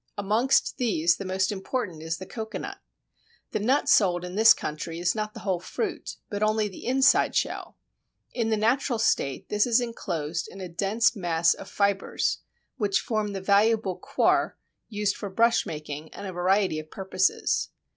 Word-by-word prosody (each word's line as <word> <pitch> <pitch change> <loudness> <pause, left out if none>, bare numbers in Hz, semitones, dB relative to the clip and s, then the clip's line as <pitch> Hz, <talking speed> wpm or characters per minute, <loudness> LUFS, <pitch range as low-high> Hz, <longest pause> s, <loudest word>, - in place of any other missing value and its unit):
Amongst 215 +6 +2
these 175 -9 +2
the 195 - -6
most 190 +1 0
important 190 -4 -4
is 160 +1 -3
the 185 - -8
Cocoanut. 220 +2 -6 0.7
The - - -1
nut 260 +8 +1
sold 180 -9 +3
in 180 - -7
this 220 +3 +7
country 165 -3 -1
is 175 +1 +1
not 215 -1 -4
the - - -8
whole 190 -4 -1
fruit, - - -4
but 205 0 -4
only 215 0 +2
the 195 - -9
inside 265 +2 +4
shell. - - -2 0.6
In 230 -2 -1
the 220 - +2
natural 240 +3 +1
state 140 -10 0
this 210 +2 +2
is 235 0 +4
enclosed 170 -9 -3
in 195 - -11
a 185 - -5
dense 205 +7 +1
mass 170 -4 +2
of 195 - -10
fibres, 200 -1 0 0.4
which 200 -4 +1
form 215 -3 -2
the 195 - -4
valuable 205 0 +3
"coir" - - +1 0.3
used 210 -2 -1
for 200 - -6
brushmaking 160 -9 0
and - - -7
a 190 - -5
variety 185 -1 +1
of 155 0 -10
purposes. 190 0 0
200 Hz, 165 wpm, -26 LUFS, 180-220 Hz, 0.7 s, this